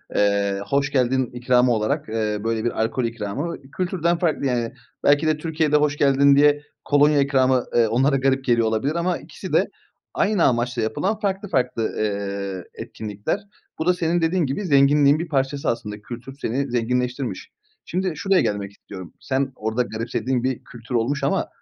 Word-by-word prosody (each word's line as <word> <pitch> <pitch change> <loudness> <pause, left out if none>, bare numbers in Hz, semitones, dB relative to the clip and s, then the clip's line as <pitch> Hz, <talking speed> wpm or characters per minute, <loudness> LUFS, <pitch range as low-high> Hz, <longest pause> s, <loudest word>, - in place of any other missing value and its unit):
Eee, 100 -1 +1
hoş 140 0 +1
geldin 130 -1 +2
ikramı 125 0 +3
olarak, 110 -1 -1
eee, 110 -1 -1
böyle 115 -1 -1
bir 120 - -1
alkol 115 +3 -1
ikramı. 115 +9 -3 0.2
Kültürden 175 -2 0
farklı 165 -4 0
yani. 120 -3 -1 0.3
Belki 145 +2 +4
de 155 -1 +2
Türkiye'de 155 -1 0
hoş 150 -1 +2
geldin 140 0 +5
diye 145 +1 +4 0.2
kolonya 145 0 +4
ikramı, 130 -2 +2
eee, 115 -2 +4
onlara 130 +5 +2
garip 135 0 +1
geliyor 120 -2 +3
olabilir 110 +8 0
ama 175 +1 0
ikisi - - -9
de - - +4 0.5
aynı 200 -4 +2
amaçla 120 -1 +1
yapılan 185 - -1
farklı 200 -1 -2
farklı, 125 -5 0
eee, 100 -2 -3
etkinlikler. 105 - -4 0.4
Bu 160 - -1
da 180 - +4
senin 175 -1 0
dediğin 165 +1 +1
gibi 140 +10 -3
zenginliğin 145 -1 +4
bir 170 - -3
parçası 140 -1 -1
aslında. 105 -3 -4
Kültür 120 +4 -8
seni 135 +3 -2
zenginleştirmiş. 125 -1 -2 0.4
Şimdi 185 -1 -1
şuraya 190 +4 +2
gelmek 100 -1 -2
istiyorum. 95 -3 -11
Sen 135 0 -1
orada 110 +3 -1
garipsediğin 120 +2 -2
bir 130 -1 -2
kültür 120 +1 -8
olmuş 125 +5 0
ama - - +1
130 Hz, 165 wpm, -22 LUFS, 115-150 Hz, 0.5 s, geldin